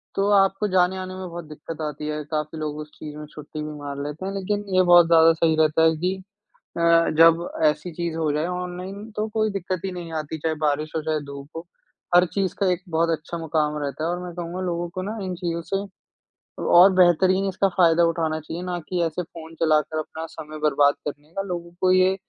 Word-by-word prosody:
तो 195 +1 +1
आपको 195 +1 +3
जाने-आने 185 0 +1
में 185 -1 -6
बहुत 170 -1 -7
दिक्कत 155 +1 -8
आती 150 +1 -6
है। 150 0 -3
काफ़ी 155 +1 -2
लोग 150 -1 -3
उस 150 0 -7
चीज़ 150 -1 -9
में 150 - -7
छुट्टी 150 0 -8
भी 150 - -5
मार 140 -1 -6
लेते 150 +6 -6
हैं। 195 - -2
लेकिन 205 +1 -2
ये 185 - +6
बहुत 175 -1 +7
ज़्यादा 165 -1 +6
सही 160 -1 +2
रहता 155 0 +3
है 160 0 +4
कि 180 +4 -1 0.6
अ, - - -1 0.4
जब 165 +1 +6 0.2
ऐसी 155 +4 -4
चीज़ 170 -1 -3
हो 155 -2 0
जाए 155 +2 0
ऑनलाइन, 180 +4 -5
तो 215 +1 -1
कोई 215 0 0
दिक्कत 185 -2 -3
ही 190 - -2
नहीं 175 -2 -7
आती। 155 +1 -5
चाहे 160 +1 -1
बारिश 150 0 0
हो, 160 - 0
चाहे 155 -1 0
धूप 140 0 -8
हो, 165 +2 -6 0.5
हर 180 +1 +7
चीज़ 195 -2 0
का 200 - +2
एक 180 0 -2
बहुत 165 +1 +1
अच्छा 165 +3 -7
मुकाम 155 -2 -1
रहता 145 +2 -4
है। 165 - 0
और 175 0 -2
मैं 175 -1 -7
कहूँगा, 175 +1 -5
लोगों 175 0 -2
को 185 +2 -5
ना 215 +4 -4
इन 185 - -3
चीज़ों 170 -1 -3
से 195 +1 0 0.9
और 190 +2 +9
बेहतरीन 185 +2 +4
इसका 195 +1 +1
फायदा 170 -1 +5
उठाना 160 -1 0
चाहिए, 165 +3 -6
ना 180 -1 -3
कि 180 -1 -1
ऐसे 165 +2 -2
फ़ोन 165 -1 -11
चलाकर 155 0 +2
अपना 160 +1 -5
समय 155 -1 -8
बर्बाद 145 -1 +4
करने 150 +2 -9
का 195 - -2
लोगों 175 -3 -5
को 185 - +3
ये 185 +1 +4
170 Hz, 220 wpm, -24 LUFS, 155-185 Hz, 0.9 s, और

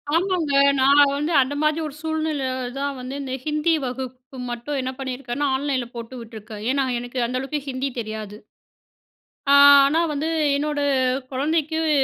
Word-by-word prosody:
ஆமாங்க. 345 -4 0 0.3
நான் 280 +2 +6
வந்து 300 +4 -1
அந்த 260 +2 -1
மாதிரி 305 +1 +2
ஒரு 285 - -9
சூழ்நிலையில 315 -3 -2 0.3
தான் 280 -1 -2
வந்து 255 +1 -6
இந்த 260 -1 -5
ஹிந்தி 305 +2 +1
வகுப்பு 255 +1 -7
மட்டும் 240 +4 -3
என்ன 260 0 -3
பண்ணியிருக்கேன்னா, 265 +1 -3
ஆன்லைன்ல 265 -3 -1
போட்டு 235 +2 -7
விட்டுருக்கேன். 220 -2 -9
ஏன்னா 275 -1 +1
எனக்கு 245 +1 -5
அந்த 255 +1 -2
அளவுக்கு 290 +2 -3
ஹிந்தி 260 +1 -2
தெரியாது. 215 -2 -6 1.1
ஆ. - - +7 0.3
ஆனா 310 +4 +2
வந்து 300 +2 -2 0.3
என்னோட 295 +1 -1 0.5
குழந்தைக்கு 310 +4 0
வு - - +1
275 Hz, 150 wpm, -23 LUFS, 255-300 Hz, 1.1 s, ஆ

